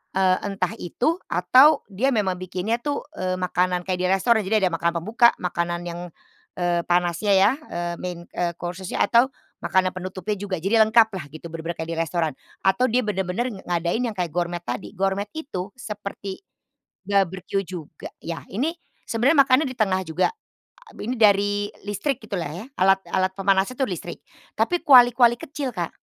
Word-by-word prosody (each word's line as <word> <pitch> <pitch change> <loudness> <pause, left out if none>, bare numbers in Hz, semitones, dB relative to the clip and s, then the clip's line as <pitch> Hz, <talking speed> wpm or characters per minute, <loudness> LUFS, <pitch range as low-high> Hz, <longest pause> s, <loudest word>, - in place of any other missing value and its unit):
eee, 185 -1 +3
entah 195 -3 -2
itu 280 - -1
atau 285 +3 +5
dia 230 +7 0
memang 200 -6 +1
bikinnya 185 +5 -2
tuh, 290 -1 -2
eee, 185 -4 -2
makanan 180 0 0
kayak 180 -1 -1
di 185 - 0
restoran. 220 +4 +3
Jadi 200 0 +2
ada 180 - -3
makanan 170 +1 0
pembuka, 230 +6 +4
makanan 175 0 -2
yang, 170 0 -5 0.6
eee, 175 -1 +1
panasnya 175 +3 +1
ya, 195 +3 +5 0.2
eee, 175 0 -3
main, 180 -1 -4 0.2
eee, 175 -1 0
course-nya, 180 +1 -2
atau 245 +3 +4 0.3
makanan 185 -1 +1
penutupnya 185 +2 -4
juga. 195 -2 -3
Jadi 195 +7 -2
lengkaplah 220 -7 +4
gitu. 155 +3 -12
Benar-benar 165 +1 -5
kayak 160 +1 -4
di 165 - -6
restoran 165 -2 0 0.3
atau 190 +7 +3
dia 245 +1 +1
benar-benar 190 +2 -1 0.2
ngadain 175 +5 0
yang 215 - -7
kayak 175 -4 -2
gourmet 175 0 -1
tadi. 120 +1 -4
Gourmet 195 +2 0
itu 195 - -5
seperti 205 - -7 0.6
barbeque 195 0 0
juga 170 -4 -8
ya. 165 -1 -5
Ini 280 - -1 0.3
sebenarnya 255 +7 +2
makannya 270 +3 +3
di 255 - -9
tengah 195 -4 +1
juga. 160 +3 +1 0.6
Abi 235 - -6
nih 255 - -4
dari 205 -1 +5 0.4
listrik 240 +5 -2
gitulah 195 -8 -4
ya, 195 +7 -7
alat 195 +1 +4
alat 185 0 +1
pemanasnya 195 +3 +2
itu 265 - +2
listrik, 180 -4 -6 0.4
tapi 350 -1 +1
kuali-kuali 245 -3 +7
kecil, 280 -3 -4
Kak. 175 -5 -4
190 Hz, 165 wpm, -23 LUFS, 175-225 Hz, 0.6 s, kuali-kuali